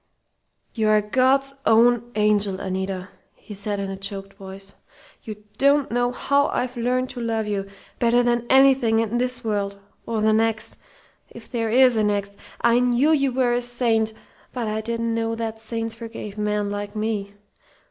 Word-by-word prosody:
"You 220 -2 0
are 215 0 +5
God's 260 +5 +2
own 235 +1 +3
angel, 210 -2 +2
Anita!" 190 0 -4 0.3
he 210 - -12
said 205 0 -2
in 195 -1 -3
a - - -4
choked 195 0 -6
voice. 195 0 -11 0.5
"You 210 -2 -9 0.2
don't 280 -1 +3
know 245 +1 +1
how 280 +3 +1
I've 250 0 -2
learned 250 +2 -1
to 245 - -6
love 225 -1 -1
you, 200 -2 -3 0.3
better 240 +1 +3
than 240 0 0
anything 265 -4 +5
in 230 +1 0
this 250 0 -2
world 200 -2 -2 0.3
or 225 -2 -1
the 215 0 +3
next 225 0 +1 0.5
if 235 - -13
there 230 -3 -1
is 250 0 +5
a 215 - +2
next. 200 -1 -1 0.3
I 235 0 +4
knew 250 +4 +3
you 275 -4 +2
were 250 -1 +1
a 245 - +1
saint, 235 -2 +1 0.4
but 240 -3 -3
I 215 +1 -2
didn't 230 +1 -2
know 225 0 -1
that 225 -1 -4
saints 225 0 -4
forgave 225 -3 -8
men 210 -1 -1
like 205 +1 -5
me.... 210 -2 -3
225 Hz, 170 wpm, -23 LUFS, 210-245 Hz, 0.5 s, are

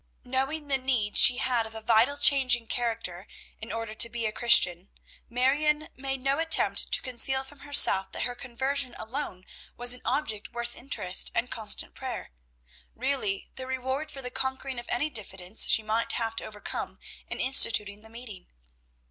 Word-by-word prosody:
Knowing 270 +4 -3
the 270 -1 +1
need 245 -6 -1
she 245 - +8
had 240 -3 -1
of 220 - -13
a - - -5
vital 230 +6 +2
change 270 -3 +5
in 235 -1 -10
character, 225 -6 -4 0.3
in 220 - -9
order 225 -1 -5
to 235 +2 +3
be 230 0 -4
a 215 - -1
Christian, 190 -6 +3 0.4
Marion 295 +5 0
made 270 0 -5
no 275 +2 0
attempt 325 0 +2
to - - +5
conceal 265 +1 +3
from 275 +1 -15
herself 270 -10 +4
that - - -5
her 245 - -3
conversion 260 +1 -3
alone 220 -6 -6 0.3
was 245 0 +5
an 250 - -11
object 220 -8 -3
worth 240 0 -5
earnest 210 -8 0
and 245 - -2
constant 215 -2 0
prayer; 260 - -7 0.6
really 255 -6 -3
the 260 0 -6
reward 260 +4 -4
for 275 -3 -9
the 250 - -7
conquering 265 0 -3
of 240 - -11
any 295 +6 -1
diffidence 190 -3 0
she 220 - +7
might 220 +2 -1
have 225 -1 -3
to - - -6
overcome 210 -1 -7 0.3
in - - -5
instituting 210 -5 +2
the 220 - -15
meeting. 225 -5 -11
245 Hz, 175 wpm, -27 LUFS, 220-265 Hz, 0.6 s, she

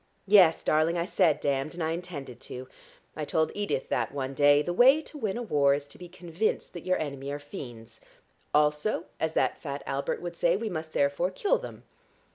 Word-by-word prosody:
Yes, 190 -5 +6
darling, 155 +3 +2
I 170 - 0
said 175 -5 +2
damned, 140 +3 -1
and 175 - -3
I 160 - 0
intended 155 -8 -6
to. 130 +1 -8 0.5
I 155 - -4
told 160 +1 0
Edith 205 -10 -2
that 115 -2 0
one 135 -1 -4
day. 145 +1 +5
The 175 - -2
way 260 - +6
to - - -14
win 215 -4 -2
a 240 - -3
war 140 -9 +3
is 145 0 -5
to - - -15
be 180 -1 -10
convinced 175 +3 -3
that 175 0 -9
your 185 - +2
enemy 140 -2 -4
are 145 - -3
fiends. 120 -6 -10 0.5
'Also,' 150 +6 +1
as 160 0 -1
that - - 0
fat 140 -1 -5
Albert 140 0 -2
would 175 -1 -6
say, 170 +2 +2
'we 220 +1 -3
must 160 -2 -5
therefore 140 +5 +1
kill 410 - +1
them.' - - -9
160 Hz, 205 wpm, -28 LUFS, 140-180 Hz, 0.5 s, Yes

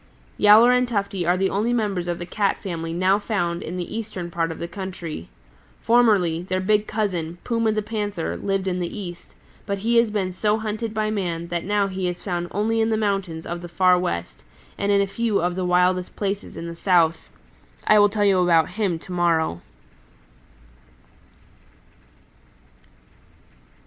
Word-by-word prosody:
"Yowler 215 +4 +7
and 250 0 +3
Tufty 200 -6 -2
are 175 +1 +3
the 190 +1 +1
only 215 +4 0
members 200 -7 -1
of 175 -1 -2
the 175 - -6
Cat 200 +2 0
family 165 -3 -5
now 185 +4 +2
found 175 -6 -2
in 175 +3 -5
the 180 +4 -5
eastern 200 -6 -5
part 165 -1 -1
of 160 - -7
the 170 - -5
country. 175 - -7 0.5
Formerly, 210 -9 +3
their 185 +1 -2
big 210 +2 +1
cousin, 180 -6 -2
Puma 230 -2 +1
the 215 0 -1
Panther, 205 -5 -3
lived 195 -1 -2
in 180 -1 -1
the 175 +4 -4
East, 175 -3 -9 0.3
but 200 -1 -1
he 230 +4 +1
has 230 -1 +4
been 200 -3 -1
so 210 +3 +1
hunted 220 +1 -3
by 215 0 0
man 170 -5 -3
that 170 -1 -2
now 205 0 +2
he 190 -1 -3
is 175 0 -5
found 175 -3 -2
only 225 +3 0
in 220 - +2
the 220 - +1
mountains 195 -6 -2
of 170 0 -5
the 175 - -7
Far 180 +1 +4
West 85 - -3 0.3
and 200 - 0
in 200 0 +4
a - - +2
few 215 +1 0
of 175 +1 0
the 185 -1 -2
wildest 180 0 +2
places 200 0 -3
in 170 - -6
the 170 - -6
South. 170 -2 +2 0.6
I 215 - +6
will 205 0 +6
tell 205 0 0
you 195 -2 +4
about 170 -3 +4
him 200 -6 -1
to 175 - -12
morrow." 165 - +1
190 Hz, 180 wpm, -23 LUFS, 175-210 Hz, 0.6 s, Yowler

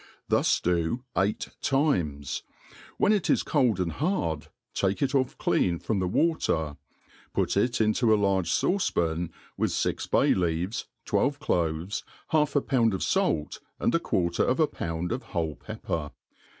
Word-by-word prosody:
Thus - - +3
do 90 +7 0
eight 100 +3 0
times; 85 - 0 0.6
when 210 - +4
it 205 -5 0
is - - +3
cold 125 - +2
iund 90 -3 -1
hard, 85 - -1 0.3
take 100 +6 0
it 140 - 0
off 130 -2 +1
clean 85 -2 +1
from 105 +3 -1
the 95 - 0
water, 85 - +1 0.6
put - - +1
it 120 +1 +1
into 110 +2 +3
a 110 - +6
large 95 -4 +1
fauce 180 - +1
'pan, 85 0 -1 0.3
with - - +1
fix - - -1
bay - - +4
kaves, 90 +3 -1 0.2
twelve 145 0 +1
cloves, 85 - -1 0.3
half 150 -2 +2
a 145 - +4
pound 115 -7 +2
of 95 - -2
fait, 75 -2 0 0.2
and - - +1
a - - +4
quarter 85 -2 0
of 130 - +1
a 160 - +6
pound 85 - -4
of 125 +2 -1 0.2
whole 80 -3 0
pepper. 75 +1 -4
95 Hz, 160 wpm, -27 LUFS, 85-130 Hz, 0.6 s, a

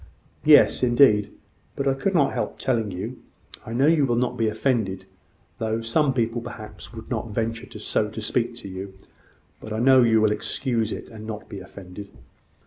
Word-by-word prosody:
"Yes, - - +6
indeed. 120 -5 +4 0.4
But 140 - -2
I 135 - +4
could 185 +8 -1
not 140 -4 +3
help - - -3
telling 115 -5 0
you. 90 -1 -6 0.5
I 115 - -5
know 130 +4 +3
you 155 -3 +4
will 120 - +1
not 125 +1 0
be 115 - +1
offended; 110 -4 -1 0.5
though 110 0 -1
some 135 +6 +2
people, 120 -2 -1
perhaps, 105 -5 -9
would 115 +2 -10
not 115 -1 -2
venture 115 +2 -3
to 105 - -10
speak 110 +3 -1
so 120 - -11
to - - -7
you; 95 0 -7 0.6
but 110 - -9
I 110 - -2
know 130 +2 +6
you 115 -2 +4
will 110 -1 +3
excuse 115 +1 -1
it, - - -6
and 110 -1 -9
not 110 -1 -6
be 100 - -7
offended." 95 +1 -10
115 Hz, 185 wpm, -24 LUFS, 105-125 Hz, 0.6 s, Yes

